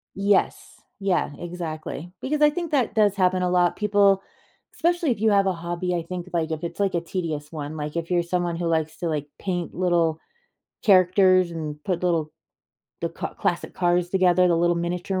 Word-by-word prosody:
Yes. 200 Hz, 0 st, 0 dB, 0.3 s
Yeah, 180 Hz, -6 st, +1 dB
exactly, 170 Hz, -1 st, -6 dB
because 300 Hz, +2 st, -2 dB
I 295 Hz, -, +6 dB
think 345 Hz, 0 st, -4 dB
that 265 Hz, -5 st, +1 dB
does 210 Hz, -2 st, +3 dB
happen 185 Hz, -1 st, +2 dB
a 180 Hz, -, +1 dB
lot, 180 Hz, -1 st, +2 dB
people 200 Hz, -2 st, +3 dB, 0.5 s
especially 345 Hz, -4 st, +1 dB
if 225 Hz, -, -2 dB
you 220 Hz, -1 st, +3 dB
have 200 Hz, -1 st, +3 dB
a -, -, +3 dB
hobby, 175 Hz, +1 st, -3 dB
I 170 Hz, -, 0 dB
think, 180 Hz, +2 st, -6 dB
like, 165 Hz, -1 st, 0 dB
if 160 Hz, +1 st, -4 dB
it's, 170 Hz, -, -5 dB
like, 195 Hz, -3 st, +1 dB
a 170 Hz, -, +1 dB
tedious 165 Hz, -4 st, -4 dB
one, 155 Hz, -1 st, -6 dB
like, 150 Hz, +2 st, -4 dB
if 170 Hz, +1 st, -3 dB
you're 175 Hz, -1 st, +2 dB
someone 175 Hz, -1 st, -1 dB
who 170 Hz, 0 st, -2 dB
likes 160 Hz, -1 st, 0 dB
to, 170 Hz, -, -2 dB
like, 150 Hz, -2 st, -2 dB
paint 175 Hz, -3 st, -3 dB
little 170 Hz, -3 st, +1 dB, 0.7 s
characters 185 Hz, -2 st, +5 dB
and 150 Hz, -2 st, -6 dB
put 180 Hz, -2 st, -1 dB
little 165 Hz, -3 st, 0 dB, 0.7 s
the -, -, -1 dB
ca -, -, -6 dB
classic -, -, -2 dB
cars 175 Hz, 0 st, +1 dB
together, 185 Hz, -1 st, +4 dB
the 170 Hz, -1 st, +3 dB
little 175 Hz, 0 st, +2 dB
miniature 180 Hz, +2 st, -2 dB
175 Hz, 195 wpm, -24 LUFS, 170-190 Hz, 0.7 s, I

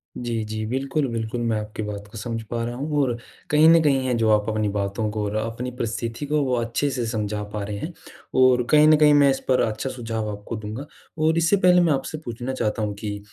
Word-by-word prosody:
जी, 115 Hz, -2 st, -3 dB
जी। 110 Hz, 0 st, -4 dB
बिल्कुल, 135 Hz, +4 st, -1 dB
बिल्कुल। 115 Hz, 0 st, -3 dB
मैं 115 Hz, -2 st, 0 dB
आपकी 105 Hz, 0 st, -5 dB
बात 105 Hz, -1 st, -6 dB
को 115 Hz, -, -9 dB
समझ 115 Hz, +1 st, -4 dB
पा 115 Hz, -1 st, -1 dB
रहा 120 Hz, 0 st, -4 dB
हूँ, 145 Hz, +2 st, -1 dB
और 120 Hz, -3 st, -1 dB, 0.3 s
कहीं 150 Hz, +1 st, +5 dB
न 165 Hz, -1 st, +7 dB
कहीं 135 Hz, -3 st, +2 dB
है 125 Hz, -, +1 dB
जो 110 Hz, -1 st, +2 dB
आप 105 Hz, +1 st, -4 dB
अपनी 110 Hz, -1 st, 0 dB
बातों 100 Hz, +2 st, -1 dB
को 105 Hz, -1 st, -2 dB
और 105 Hz, +1 st, -3 dB
अ, 110 Hz, -, +1 dB
अपनी 120 Hz, +2 st, -5 dB
परिस्थिति 115 Hz, +2 st, -4 dB
को, 150 Hz, +1 st, +1 dB
वो 130 Hz, -2 st, 0 dB
अच्छे 120 Hz, +5 st, -1 dB
से 125 Hz, -3 st, -2 dB
समझा 105 Hz, -1 st, -2 dB
पा 105 Hz, -1 st, -3 dB
रहे 100 Hz, 0 st, -4 dB
हैं। 165 Hz, -, -5 dB, 0.5 s
और 125 Hz, -1 st, +5 dB
कहीं 150 Hz, 0 st, +7 dB
न 155 Hz, -1 st, +7 dB
कहीं 150 Hz, -1 st, +6 dB
मैं 145 Hz, -1 st, +6 dB
इस 135 Hz, -, +1 dB
पर 130 Hz, -1 st, +3 dB
अच्छा 110 Hz, +4 st, -1 dB
सुझाव 115 Hz, -4 st, -4 dB
आपको 105 Hz, +3 st, -7 dB
दूँगा, 110 Hz, +6 st, -6 dB, 0.3 s
और 160 Hz, +1 st, +2 dB
इससे 170 Hz, +4 st, +3 dB
पहले 180 Hz, -1 st, +5 dB
मैं 165 Hz, -4 st, +3 dB
आपसे 135 Hz, +3 st, -3 dB
पूछना 120 Hz, +2 st, -4 dB
चाहता 110 Hz, -3 st, -1 dB
हूँ 105 Hz, -1 st, -1 dB
कि 105 Hz, -1 st, -4 dB
120 Hz, 245 wpm, -23 LUFS, 110-140 Hz, 0.5 s, न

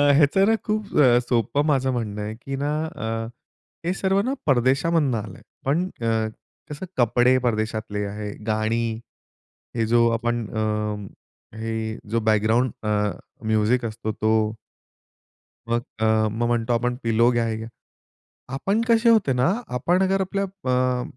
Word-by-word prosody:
ह्याचं 155 Hz, +7 st, +4 dB
ना 225 Hz, -, +4 dB
खूप 215 Hz, 0 st, -1 dB
अ, 120 Hz, -4 st, +6 dB
सोपं 120 Hz, +4 st, 0 dB
माझं 135 Hz, -3 st, +2 dB
म्हणणं 110 Hz, -4 st, -3 dB
आहे 105 Hz, +1 st, -4 dB
की 135 Hz, +1 st, -4 dB
ना 145 Hz, -, 0 dB
अ, 160 Hz, -8 st, -6 dB, 0.8 s
हे 175 Hz, -, +1 dB
सर्व 195 Hz, 0 st, +1 dB
ना 260 Hz, -, 0 dB
परदेशामधून 140 Hz, +2 st, +2 dB
आलंय. 105 Hz, -4 st, -6 dB, 0.2 s
पण 150 Hz, +6 st, +2 dB, 0.2 s
अ, 115 Hz, -1 st, +1 dB, 0.4 s
कसं 150 Hz, +5 st, -6 dB
कपडे 125 Hz, +1 st, +4 dB
परदेशातले 110 Hz, -3 st, -2 dB
आहे, 105 Hz, +1 st, -5 dB, 0.2 s
गाणी, 110 Hz, +2 st, +1 dB, 0.9 s
हे 115 Hz, -1 st, +1 dB
जो 115 Hz, +1 st, +4 dB
आपण 120 Hz, -1 st, -1 dB
अ, -, -, +1 dB, 1.0 s
हे 115 Hz, 0 st, -3 dB, 0.4 s
जो 115 Hz, +1 st, +1 dB
बॅकग्राऊंड 110 Hz, +3 st, +2 dB
अ, 105 Hz, -, -3 dB, 0.6 s
म्युझिक 110 Hz, +3 st, +2 dB
असतो 110 Hz, -1 st, -3 dB
तो. 110 Hz, 0 st, +1 dB, 1.1 s
मग 120 Hz, 0 st, +1 dB, 0.2 s
अ, 110 Hz, -, +1 dB, 0.3 s
मग 115 Hz, +2 st, -1 dB
म्हणतो 120 Hz, 0 st, +1 dB
आपण 125 Hz, +1 st, 0 dB
पिलो 115 Hz, +1 st, +3 dB
घ्या, 120 Hz, -1 st, +1 dB
हे 110 Hz, -, -1 dB
घ्या. 110 Hz, +1 st, -6 dB, 0.9 s
आपण 195 Hz, +11 st, 0 dB
कसे 230 Hz, 0 st, +4 dB
होते 215 Hz, -11 st, +4 dB
ना 125 Hz, +7 st, +2 dB, 0.2 s
आपण 175 Hz, +9 st, +2 dB
जर 195 Hz, 0 st, +1 dB
आपल्या 195 Hz, +1 st, -1 dB, 0.3 s
अ, 125 Hz, 0 st, +1 dB
120 Hz, 145 wpm, -24 LUFS, 110-145 Hz, 1.1 s, अ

